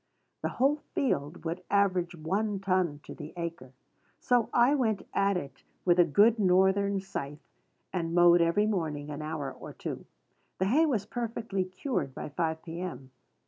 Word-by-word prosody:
The - - -1
whole 275 +4 +2 0.2
field 160 - -1
would 170 +3 -3
average 185 -4 +2
one 195 +6 -1
ton 185 -6 0
to - - -9
the 155 -1 -9
acre. 170 -7 -5 0.5
So 245 -2 +2
I 245 +3 +4
went 225 -8 0
at 200 -1 +2
it 135 -6 -8 0.2
with 175 0 +4
a - - +9
good 210 +8 +4
Northern 190 +1 +3
scythe, 150 -6 -6 0.5
and 170 -2 -2
mowed 175 0 +6
every 170 +5 +3
morning 155 -8 -2
an 145 +1 -5
hour 155 -2 -4
or - - -10
two. - - -6 0.5
The 190 - +1
hay 300 +11 +4
was 225 -9 0
perfectly 225 -4 -3
cured 185 - -3
by - - -5
five 160 +2 -2
P.M. 165 -5 -6
185 Hz, 160 wpm, -29 LUFS, 160-205 Hz, 0.5 s, a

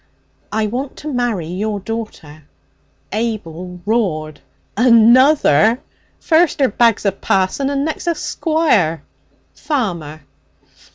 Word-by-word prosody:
'I 220 0 0
want 255 +6 -4
to 300 -1 -6
marry 240 -9 -1
your 200 +5 -3
daughter.' 195 -8 -7 0.7
Abel 185 -6 -4
roared. 165 -9 -1 0.4
'Another? 235 - +5 0.4
First 325 -1 +2
'er 270 - +3
bags 230 0 +2
a 200 - +3
parson 195 +7 -1
and 280 0 -1
next 315 +2 -4
a 340 - +1
squire!' 300 - 0 0.5
'Farmer.' 170 - -3
220 Hz, 105 wpm, -17 LUFS, 180-260 Hz, 0.7 s, Another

